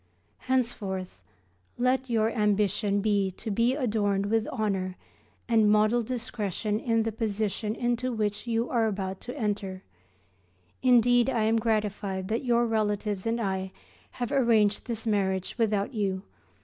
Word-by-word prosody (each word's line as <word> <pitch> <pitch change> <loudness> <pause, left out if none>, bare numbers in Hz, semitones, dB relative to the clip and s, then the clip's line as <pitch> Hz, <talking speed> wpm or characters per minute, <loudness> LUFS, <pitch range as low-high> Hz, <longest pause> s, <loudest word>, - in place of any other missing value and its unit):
Henceforth, 195 - -1 0.6
let 255 +1 +1
your 225 -1 +2
ambition 205 -1 +1
be 200 -2 +2
to 220 - -4
be 235 +5 +2
adorned 205 -7 0
with 225 -1 +1
honour 195 -6 -2 0.5
and 225 -3 +4
modest 215 +2 +3
discretion 215 -4 -2
in 225 -1 +1
the 225 - -1
position 215 -1 -2
into 240 +1 -1
which 215 0 -2
you 230 +1 0
are 230 -3 +1
about 195 -2 -3
to 250 +3 -7
enter. 200 -5 -2 1.0
Indeed 245 0 +5
I 230 -4 +1
am 220 +1 +3
gratified 210 -3 -1
that 225 +5 -1
your 240 -1 +3
relatives 210 -2 -1
and 230 +1 0
I 190 -3 -2 0.4
have 245 +1 -4
arranged 230 -7 +3
this 230 -2 -4
marriage 190 -3 0
without 210 +1 +1
you. 195 -4 -1
215 Hz, 135 wpm, -28 LUFS, 200-235 Hz, 1.0 s, Indeed